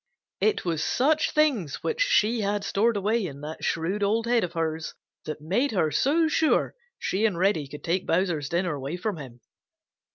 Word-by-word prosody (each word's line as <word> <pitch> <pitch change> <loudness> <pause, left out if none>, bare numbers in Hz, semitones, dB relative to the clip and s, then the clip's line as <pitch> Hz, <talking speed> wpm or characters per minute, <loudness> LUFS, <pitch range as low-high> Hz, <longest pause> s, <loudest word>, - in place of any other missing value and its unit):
It 430 - +1
was 165 -3 -1
such 305 +4 +2
things 260 - +1
which 470 +1 -1
she 240 - +3
had 205 0 -1
stored 225 +2 +1
away 215 +3 +1
in 140 -6 -6
that 155 +2 -7
shrewd 175 +6 -1
old 220 +3 +1
head 235 -1 +2
of 175 -1 -3
hers 160 -1 -3 0.3
that 155 -1 -5
made 220 - 0
her 160 -6 +1
so 305 - +2
sure 315 0 +2 0.2
she 195 +3 -1
and 210 -6 +2
Reddy 180 -5 +1
could 145 +2 -10
take 180 +2 -1
Bowser's 165 -5 0
dinner 175 -1 0
away 140 +4 -4
from 195 0 -3
him. 125 -5 -10
190 Hz, 185 wpm, -26 LUFS, 160-230 Hz, 0.3 s, she